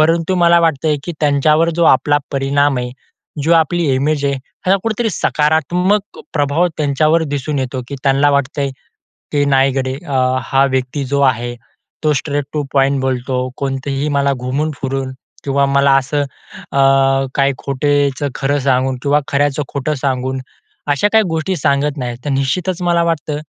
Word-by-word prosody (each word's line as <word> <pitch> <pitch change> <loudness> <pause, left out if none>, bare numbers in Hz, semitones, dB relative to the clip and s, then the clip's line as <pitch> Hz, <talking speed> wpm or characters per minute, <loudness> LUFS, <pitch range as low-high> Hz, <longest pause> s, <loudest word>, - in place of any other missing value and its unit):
परंतु 165 +3 +2
मला 170 -1 +5
वाटतंय, 155 -2 +1
की 175 - -4
त्यांच्यावर 150 +2 +3
जो 170 - +3
आपला 145 -2 +4
परिणाम 140 0 +1
आहे, 125 0 -4 0.5
जो 160 +4 +2
आपली 170 +1 +2
इमेज 145 +2 0
आहे, 140 - +1 0.3
हा 190 +1 +4
कुठेतरी 225 0 -1
सकारात्मक 175 +6 0 0.2
प्रभाव 145 +3 +2
त्यांच्यावर 155 +2 +2
दिसून 145 +1 -2
येतो, 130 0 -3
की 140 - -5
त्यांना 140 +1 +3
वाटतंय, 140 0 0 0.6
की 145 -1 +2
नाही 135 +1 +4
गडे 130 -1 -2
अ, 140 - -2 0.3
हा 135 0 +2
व्यक्ती 130 +1 -2
जो 140 0 +2
आहे, 120 +1 -5 0.5
तो 155 -1 +3
स्ट्रेट 145 -2 -3
टू 150 -1 -1
पॉईंट 135 0 +2
बोलतो, 130 0 -1
कोणतेही 135 +1 -2
मला 140 0 +2
घुमून 145 +5 -1
फिरून 135 0 -2 0.3
किंवा 140 0 +1
मला 140 0 +3
असं 145 +2 0
अ, 140 0 -7 0.6
काही 140 -1 +2
खोटेचं 145 0 0
खरं 140 +1 0
सांगून 130 -1 +1
किंवा 145 +1 +3
खऱ्याचं 145 +1 +1
खोटं 140 +2 -2
सांगून, 130 -1 -2 0.5
अशा 145 +8 +2
काही 220 0 +5
गोष्टी 160 +3 -1
सांगत 140 +1 0
नाहीत. 120 -3 -4
तर - - -1
निश्चितच 160 +7 -1
मला 170 -1 +2
वाटतं, 155 -3 -2
140 Hz, 155 wpm, -17 LUFS, 135-155 Hz, 0.6 s, मला